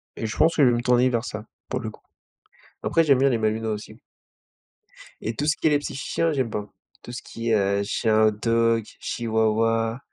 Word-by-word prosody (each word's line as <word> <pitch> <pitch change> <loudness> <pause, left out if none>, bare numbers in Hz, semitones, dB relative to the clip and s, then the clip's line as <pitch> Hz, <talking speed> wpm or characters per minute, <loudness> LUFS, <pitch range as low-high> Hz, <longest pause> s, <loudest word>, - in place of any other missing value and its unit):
Et - - -4
je 110 - -6
pense 160 +1 +4
que 150 - +4
je 130 - +6
vais 120 - +2
me 120 - -1
tourner 125 +1 +4
vers 120 -1 -1
ça, 105 -2 -6 0.2
pour 125 - -2
le 110 -3 -4
coup. - - -15 0.8
Après, 165 - +2
j'aime 140 -4 +4
bien 135 +1 +4
les 120 - +1
Malinois 110 0 -1
aussi. 105 0 -8 1.2
Et 110 0 -3
tout 145 - -2
ce 150 - +2
qui - - +1
est - - +5
les 145 - +3
petits 145 - -6
chiens, 165 +4 -1
j'aime 130 -5 -1
pas. 105 -1 -4 0.4
Tout - - -9
ce 120 - -6
qui 115 0 -5
est, 110 - +4
heu, 100 0 +1
chien 110 +1 +1
hot-dog, 115 +1 +1
chihuahua. 115 0 0
115 Hz, 220 wpm, -24 LUFS, 110-130 Hz, 1.2 s, je